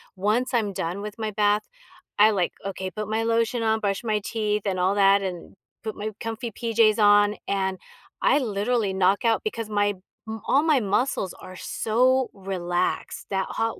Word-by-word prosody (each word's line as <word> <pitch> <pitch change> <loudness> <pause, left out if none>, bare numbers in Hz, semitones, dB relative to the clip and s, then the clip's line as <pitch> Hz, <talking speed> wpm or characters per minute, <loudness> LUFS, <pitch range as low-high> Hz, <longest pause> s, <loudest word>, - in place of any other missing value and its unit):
once 215 +7 0
I'm 215 -4 +1
done 175 +2 -3
with 210 0 -6
my 215 -1 -3
bath, 205 0 +2 0.6
I 215 +1 +7
like, 185 -4 0
okay, 190 -1 -4
put 215 +1 -5
my 220 +1 0
lotion 230 +1 +1
on, 220 0 +2
brush 200 +1 -1
my 215 -2 0
teeth 210 -2 -1
and 190 -2 -1
all 190 +3 +2
that, 200 0 +5
and 180 -3 -6 0.3
put 220 -1 -4
my 215 +1 -4
comfy 225 +1 -4
PJs 225 -1 +2
on 205 0 +5
and 190 -1 -1 0.4
I 285 - +4
literally 215 -3 0
knock 190 +3 +2
out 225 -1 +3
because 220 0 -4
my 205 -1 +1 0.3
m 220 0 -5
all 280 +3 +4
my 310 -4 +4
muscles 205 -1 0
are 185 - -10
so 255 +7 +1
relaxed 180 -2 -3
that 190 -1 0
hot 225 0 -2
210 Hz, 180 wpm, -25 LUFS, 195-225 Hz, 0.6 s, I